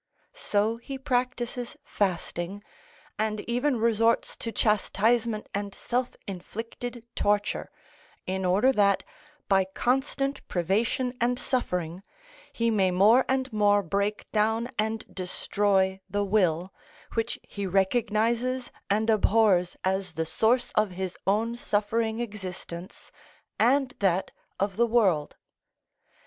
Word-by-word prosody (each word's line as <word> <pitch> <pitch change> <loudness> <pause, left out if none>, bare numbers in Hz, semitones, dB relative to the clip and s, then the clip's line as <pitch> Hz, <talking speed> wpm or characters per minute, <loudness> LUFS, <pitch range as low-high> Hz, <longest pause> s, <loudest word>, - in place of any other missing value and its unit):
So 220 - 0
he 270 +3 -7
practises 250 -2 -2
fasting, 185 0 -2 0.6
and 215 0 0
even 250 +4 0
resorts 230 0 +2
to 230 - -4
chastisement 220 +1 +1
and 200 0 -3
self 250 +1 -2
inflicted 230 +5 -6
torture, 205 0 0 0.6
in 190 +1 -2
order 195 +8 +4
that, 200 -5 +3 0.4
by 195 -1 +4
constant 270 +7 -1
privation 215 +8 0
and 245 +1 +2
suffering, 180 -10 -2 0.5
he 230 0 0
may 195 -4 +3
more 210 +8 +5
and 260 -2 0
more 205 -1 +4
break 200 +4 -1
down 220 +2 +1
and 220 +1 -1
destroy 190 +1 0
the 205 0 0
will, 185 -3 +1 0.4
which 225 -1 -1
he 200 -1 -5
recognises 230 +5 +1 0.2
and 215 +2 +2
abhors 215 -4 +3
as 190 -2 -1
the 160 - -1
source 240 +8 +2
of 215 -1 +2
his 185 0 -4
own 225 +4 +1
suffering 220 0 0
existence 185 -5 -7 0.5
and 260 +3 +3
that 190 -2 +1 0.3
of 195 0 -1
the 235 +1 +4
world. 195 -11 +2
215 Hz, 115 wpm, -27 LUFS, 190-235 Hz, 0.6 s, more